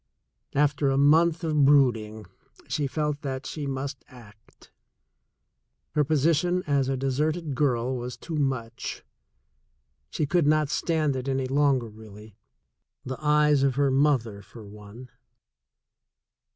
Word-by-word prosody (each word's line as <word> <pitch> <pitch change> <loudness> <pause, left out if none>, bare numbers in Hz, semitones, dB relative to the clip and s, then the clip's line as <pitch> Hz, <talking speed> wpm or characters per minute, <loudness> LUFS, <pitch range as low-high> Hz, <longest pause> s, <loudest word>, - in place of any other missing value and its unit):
After 145 0 +2
a 135 - +1
month 160 +4 +3
of 155 -3 +1
brooding, 115 -7 +2 0.4
she 145 -2 -1
felt 150 +1 -2
that 135 -1 -5
she 150 -3 -5
must 135 0 -5
act 115 -4 -18 0.6
— 70 +3 -53
her 150 - +2
position 160 +5 +1
as 140 -2 +1
a 135 - -1
deserted 150 +4 -1
girl 130 -2 0
was 125 0 -6
too 165 - -7
much. 130 -5 -3 1.1
She 150 - -2
could 165 +1 +1
not 155 -1 +2
stand 155 -3 0
it 130 0 -5
any 135 -1 -1
longer 135 -2 +1
really 105 -1 -14 0.3
— - - -50
the 130 +3 -6
eyes 150 -1 +3
of 135 -2 +1
her 140 -1 +2
mother, 130 -7 +1
for 105 +2 -13
one. 105 +4 -12
135 Hz, 135 wpm, -26 LUFS, 125-150 Hz, 1.1 s, month